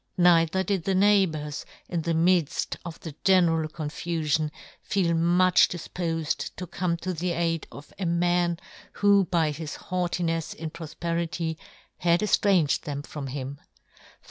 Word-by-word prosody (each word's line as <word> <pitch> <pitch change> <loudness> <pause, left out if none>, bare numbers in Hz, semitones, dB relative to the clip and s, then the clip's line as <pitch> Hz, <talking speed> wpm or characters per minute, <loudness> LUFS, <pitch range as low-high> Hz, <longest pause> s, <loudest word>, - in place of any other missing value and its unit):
Neither 175 +1 +4
did 195 -4 -1
the 195 - +1
neighbours, 185 -7 +2 0.2
in 170 -2 -2
the 165 +1 -1
midfl 170 -2 +2
of 170 -2 -8
the 160 - -7
general 170 -5 +3
confufion, 155 -1 -1 0.3
feel 180 -4 +1
much 175 +2 +4
difpofed 165 -2 -3
to 185 - -5
come 175 0 -2
to 185 - -1
the 175 +1 -2
aid 165 -1 -1
of 140 +1 -12
a 185 - -1
man 175 0 +1 0.4
who 200 -1 +4
by 165 -3 +1
his 155 0 -6
haughtinefs 175 -2 -2
in 160 0 -6
profperity 165 0 -3 0.4
had 170 +1 +3
eftranged 195 -7 +3
them 145 -3 -5
from 145 -2 -6
him. 135 +1 -5
170 Hz, 140 wpm, -26 LUFS, 160-180 Hz, 0.4 s, Neither